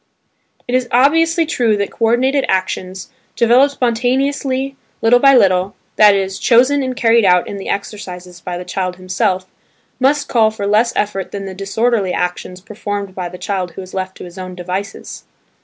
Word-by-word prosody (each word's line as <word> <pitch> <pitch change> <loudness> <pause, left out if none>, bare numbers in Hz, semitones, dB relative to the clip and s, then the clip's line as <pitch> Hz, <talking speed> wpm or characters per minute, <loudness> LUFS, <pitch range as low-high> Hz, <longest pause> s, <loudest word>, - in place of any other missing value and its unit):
It 245 - -4
is 255 -1 +1
obviously 325 +6 +3
true 235 -9 +1
that 200 0 -2
co 230 - -1
ordinated 260 +4 +2
actions, 185 +3 -2 0.2
developed 250 +4 +4
spontaneously 265 +2 -1 0.2
little 240 +2 +4
by 275 +1 +6
little 190 -4 +3 0.2
(that 210 -1 +6
is, 195 -1 -2
chosen 260 +4 +4
and 260 -1 -3
carried 230 -1 +3
out 180 -2 +3
in 200 - -6
the 195 - -7
exercises 180 -3 -6
by 175 0 -5
the 180 - -7
child 185 -1 -3
himself), 185 +1 -1 0.5
must 280 +2 +2
call 225 -3 +3
for 215 -2 -5
less 215 +4 +2
effort 200 -2 -2
than 200 -1 -5
the 190 - -6
disorderly 200 +1 0
actions 180 +1 -3
performed 205 -1 -5
by 180 -2 -5
the 180 - -10
child 185 -3 -3
who 190 - -7
is 185 - -13
left 190 0 -4
to - - -9
his 180 +1 -10
own 185 0 -7
devices. 185 +3 -6
205 Hz, 175 wpm, -17 LUFS, 185-245 Hz, 0.5 s, by